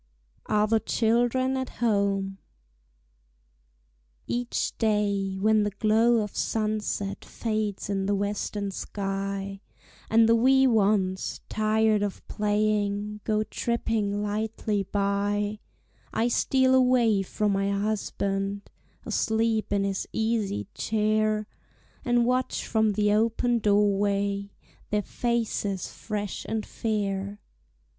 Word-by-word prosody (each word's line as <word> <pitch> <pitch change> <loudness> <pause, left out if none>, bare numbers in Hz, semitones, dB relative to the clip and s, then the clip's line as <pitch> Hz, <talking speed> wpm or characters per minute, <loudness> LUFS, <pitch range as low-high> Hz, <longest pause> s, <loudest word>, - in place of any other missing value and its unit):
ARE 210 0 +3
THE 220 +1 +2
CHILDREN 245 +4 +1
AT 260 -1 -3
HOME? 200 -3 0 1.9
Each 240 0 -2
day, 200 -3 +1
when 215 +2 +4
the 205 - +1
glow 220 +3 +3
of 210 - -7
sunset 215 -2 -2
Fades 215 -3 -3
in 195 -1 -1
the 205 - +2
western 205 0 -2
sky, 195 0 -4 0.5
And 225 0 +5
the 230 - +5
wee 265 +3 +5
ones, 200 -5 +1
tired 215 0 +2
of 205 -2 -4
playing, 210 0 0
Go 215 -1 +1
tripping 215 -3 -1
lightly 210 0 -1
by, 205 +1 -1 0.5
I 235 +2 +1
steal 260 +2 +3
away 250 -5 +4
from 205 +2 -1
my 195 0 +1
husband, 200 -1 -2 0.3
Asleep 220 -1 0
in 200 -1 +2
his 195 -1 -2
easy 220 - -1
chair, 215 0 +1 0.6
And 240 -1 +2
watch 255 +1 0
from 220 -1 +2
the 210 +1 +2
open 230 +2 +2
door 205 -1 +3
way 200 0 -1 0.3
Their 210 0 0
faces 225 -6 -2
fresh 205 -3 -4
and 220 -1 -2
fair. 200 -2 -2
210 Hz, 110 wpm, -27 LUFS, 200-225 Hz, 1.9 s, And